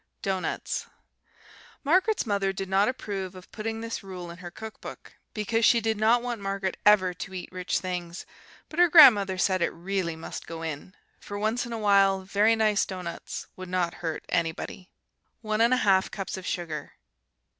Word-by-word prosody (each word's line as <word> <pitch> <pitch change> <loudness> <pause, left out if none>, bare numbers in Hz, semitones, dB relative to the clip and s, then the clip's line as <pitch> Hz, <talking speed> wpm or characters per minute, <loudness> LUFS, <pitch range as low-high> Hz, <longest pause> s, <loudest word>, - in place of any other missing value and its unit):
Doughnuts 190 -2 -2 1.0
Margaret's 370 +8 +2
mother 200 -3 0
did 195 0 -5
not 195 +2 +3
approve 195 -7 -4
of 185 0 -13
putting 225 +1 -4
this 230 0 -4
rule 180 -3 -8
in 170 - -11
her 175 -1 -7
cook 220 +5 -10
book, - - -10 0.2
because 225 +2 0
she 235 - +6
did 225 0 0
not 225 +3 +3
want 240 -3 -4
Margaret 195 -1 -2
ever 190 -3 +5
to 190 +2 -8
eat 180 - -7
rich 185 0 -1
things; 180 -1 -5 0.4
but 315 - -6
her 355 - +7
grandmother 210 - +7
said 185 0 +1
it - - +2
really 175 -1 -3
must 160 - -8
go 165 0 -6
in, 160 +3 -6 0.2
for 205 - -7
once 220 +4 -1
in - - -8
awhile 200 -3 +3
very 205 +4 +3
nice 215 -2 +2
doughnuts 180 -3 -6
would 185 -1 -8
not 180 -2 0
hurt 160 -2 -4
anybody. 170 +3 -2 0.5
1 215 -1 -1
1/2 225 -5 +3
cups 195 -2 -5
of 190 -1 -7
sugar. 165 -4 -4
195 Hz, 170 wpm, -27 LUFS, 180-220 Hz, 1.0 s, her